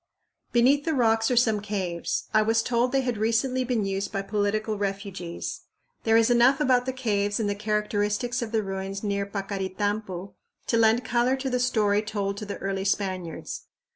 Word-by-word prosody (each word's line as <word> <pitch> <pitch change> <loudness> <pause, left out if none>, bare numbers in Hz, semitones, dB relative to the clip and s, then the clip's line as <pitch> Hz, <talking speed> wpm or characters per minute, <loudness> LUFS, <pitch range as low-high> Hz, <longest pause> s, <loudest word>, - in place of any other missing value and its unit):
Beneath 260 +4 +4
the 320 -1 0
rocks 225 -3 +3
are 250 - +1
some 220 -3 +3
caves. 190 -5 -2
I 215 - +5
was 225 +1 +2
told 245 +1 +1
they 270 0 +2
had 245 -4 -2
recently 240 +4 +1
been 240 -4 0
used 195 0 -2
by 195 -1 -2
political 210 +1 -1
refugees. 195 -3 -4 0.4
There 225 0 +5
is 230 +1 +4
enough 245 +3 +5
about 255 -3 +3
the - - +1
caves 205 -5 0
and 215 - 0
the 205 - +1
characteristics 210 +3 -1
of 230 -2 -4
the 220 -2 +1
ruins 195 +1 -4
near 200 -1 -1
Paccaritampu 195 -1 -3 0.3
to 230 - +1
lend 225 +1 +4
color 240 +2 +2
to 265 0 -3
the 250 - +1
story 210 -4 +2
told 205 -2 -3
to 210 0 -6
the 200 - -4
early 195 0 -2
Spaniards. 185 -4 -3
215 Hz, 180 wpm, -26 LUFS, 200-240 Hz, 0.4 s, I